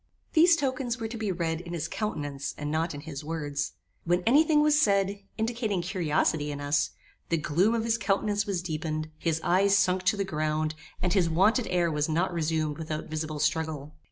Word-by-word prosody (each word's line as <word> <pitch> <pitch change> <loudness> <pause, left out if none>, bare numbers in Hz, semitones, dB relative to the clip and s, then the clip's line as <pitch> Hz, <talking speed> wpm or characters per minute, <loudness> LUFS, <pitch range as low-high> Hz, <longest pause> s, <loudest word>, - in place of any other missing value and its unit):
These 340 +1 +6
tokens 260 -4 -2
were 225 - -2
to 230 - -7
be 215 -3 -2
read 165 -2 -2
in 175 -1 -8
his 165 -3 -2
countenance, 145 -10 -4
and 150 0 -3
not 160 0 -1
in 145 - -7
his 150 -2 -7
words. 145 -2 -3 0.3
When 175 +1 +1
any 280 +7 +6
thing 300 -2 +3
was 300 0 +4
said, 200 -2 +2 0.2
indicating 220 -5 -1
curiosity 160 -4 0
in 145 - -5
us, 145 0 +1 0.4
the 165 - +2
gloom 175 +9 +2
of 225 - 0
his 230 0 +1
countenance 205 0 0
was 185 -4 -1
deepened, 155 -2 -3
his 165 -2 0
eyes 195 +3 +4
sunk 185 -1 +2
to 205 - +3
the 200 - 0
ground, 155 -2 -1 0.3
and 180 - +2
his 180 -4 +3
wonted 210 +9 +3
air 175 -2 +1
was 150 0 0
not 175 +3 +1
resumed 155 -2 -1
without 155 -1 -4
visible 155 -1 -3
struggle. 155 -1 -1
170 Hz, 195 wpm, -28 LUFS, 155-205 Hz, 0.4 s, These